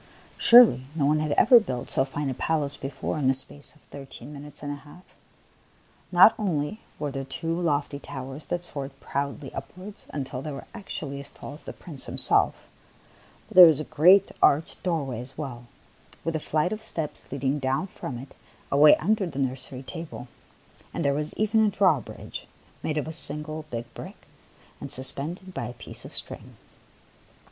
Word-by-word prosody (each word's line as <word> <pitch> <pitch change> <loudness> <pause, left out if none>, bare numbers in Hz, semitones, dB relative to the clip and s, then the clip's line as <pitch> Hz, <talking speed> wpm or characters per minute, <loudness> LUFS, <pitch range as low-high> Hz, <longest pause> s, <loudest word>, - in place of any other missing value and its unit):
Surely, 230 - +7
no 150 -4 +1
one 150 +2 +3
had 155 -1 -1
ever 245 - +7
built 125 - -5
so 130 - +2
fine 140 +2 -4
a 135 - -1
palace 145 0 -1
before 135 +2 -4
in 135 - +1
the 135 - +5
space 140 +3 -2
of 150 - -24
thirteen 135 0 -11
minutes 145 +1 -9
and 145 - -3
a 145 - -5
half! 155 +5 -15 1.1
Not 185 +4 +8
only 180 -1 -1 0.2
were 145 -2 -3
there 135 0 -4
two 165 +5 -3
lofty 145 -3 -1
towers 135 +2 -8
that 175 +1 -3
soared 140 -3 -7
proudly 140 0 -4
upwards 185 +9 -9
until 135 -3 -5
they 150 - -5
were 140 - -8
actually 155 -10 -6
as 140 - -9
tall - - -10
as 150 - -12
the - - -8
Prince 155 -7 0
himself, - - +3 0.8
but - - -13
there 180 -1 +11
was 155 -3 +3
a - - -2
great 180 +7 +5
arched 150 +3 +3
doorway 140 -10 -2
as 125 +2 -4
well, 125 -5 -6 0.6
with 165 -1 -2
a - - 0
flight 155 +5 0
of 215 - -6
steps 160 -8 -5
leading 140 +1 -1
down 135 +6 0
from 140 -9 -7
it 130 +3 -10 0.4
away 150 +2 +7
un 195 +7 +1
der 205 -4 -1
the 145 -5 -8
nursery 130 -1 -3
table; 165 -4 -8 0.7
and - - -2
there 140 - +3
was 150 +2 -3
even 220 +1 +2
a 215 - +4
drawbridge, 185 - -1 0.3
made 155 - -2
of 150 - -2
a - - -4
single 155 0 +1
big 120 -2 -4
brick - - -9 0.6
and 140 - -5
suspended 155 +8 +1
by 120 - -4
a 120 - -7
piece 120 - -5
of - - -7
string. - - -6
145 Hz, 185 wpm, -26 LUFS, 135-165 Hz, 1.1 s, there